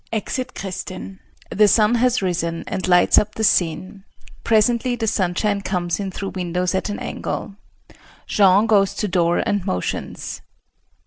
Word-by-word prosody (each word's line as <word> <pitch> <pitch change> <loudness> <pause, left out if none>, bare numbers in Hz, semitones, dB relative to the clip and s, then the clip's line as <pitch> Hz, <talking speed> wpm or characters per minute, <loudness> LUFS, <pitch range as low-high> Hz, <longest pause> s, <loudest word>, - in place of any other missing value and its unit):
[Exit 250 +3 -3
Kristin. 190 0 -7 0.3
The 210 +1 +4
sun 215 +2 +4
has 245 -2 +2
risen 170 -2 -2
and 185 - -3
lights 180 -1 +5
up 210 +1 -3
the 220 - -3
scene. 185 +1 0 0.4
Presently 235 +2 +2
the 230 -2 -3
sunshine 200 +1 0
comes 175 -3 -2
in 195 -1 -3
through 195 +1 -5
windows 180 0 -2
at 190 - -1
an 205 - -3
angle. 200 - -5 0.7
Jean 200 +1 +4
goes 200 -3 +2
to 210 - -2
door 175 -2 +1
and 205 -2 0
motions. 90 - -4
195 Hz, 145 wpm, -21 LUFS, 180-215 Hz, 0.7 s, lights